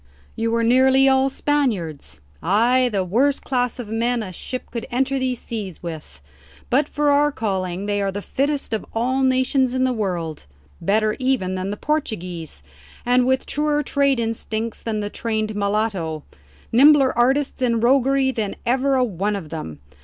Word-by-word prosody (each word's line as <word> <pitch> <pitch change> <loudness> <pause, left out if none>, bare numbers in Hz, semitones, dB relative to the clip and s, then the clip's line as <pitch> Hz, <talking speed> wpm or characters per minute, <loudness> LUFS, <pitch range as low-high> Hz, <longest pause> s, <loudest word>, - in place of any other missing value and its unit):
"You 230 0 -1
were 230 0 +1
nearly 260 +3 +5
all 265 0 +4
Spaniards?" 230 - -2 0.2
"Ay; 240 +7 +3
the 195 -3 0
worst 255 +10 +1
class 250 -2 -1
of 245 -4 -6
men 230 +1 0
a 185 -3 -7
ship 255 +8 -6
could 235 -2 -5
enter 265 +2 0
these 255 -2 -1
seas 205 -7 -6
with. 150 - -8 0.5
But 280 +4 +2
for 295 0 +1
our 295 +1 +3
calling 190 -5 -3
they 205 0 0
are 195 0 0
the 200 - -4
fittest 280 -2 -1
of 220 - -1
all 255 +4 0
the 260 - +4
nations 260 0 +1
in 260 - +1
the 255 -1 +2
world; 175 - -3 0.3
better 215 +1 +1
even 255 -8 0
than 185 +1 -3
the 205 - -4
Portuguese, 180 - -3 0.4
and 250 +1 +3
with 260 0 +1
truer 295 0 0
trade 280 -2 +1
instincts 225 0 -3
than 215 -2 -2
the 205 0 -4
trained 215 -2 -2
mulatto 200 -7 -1 0.5
nimbler 275 +2 +6
artists 265 +3 +1
in 235 -2 +2
roguery 265 +2 +3
than 220 -5 -3
ever 265 +3 +2
a 255 - +3
one 205 -2 -1
of 175 -6 -6
them. 80 - -7
235 Hz, 170 wpm, -22 LUFS, 200-265 Hz, 0.5 s, nimbler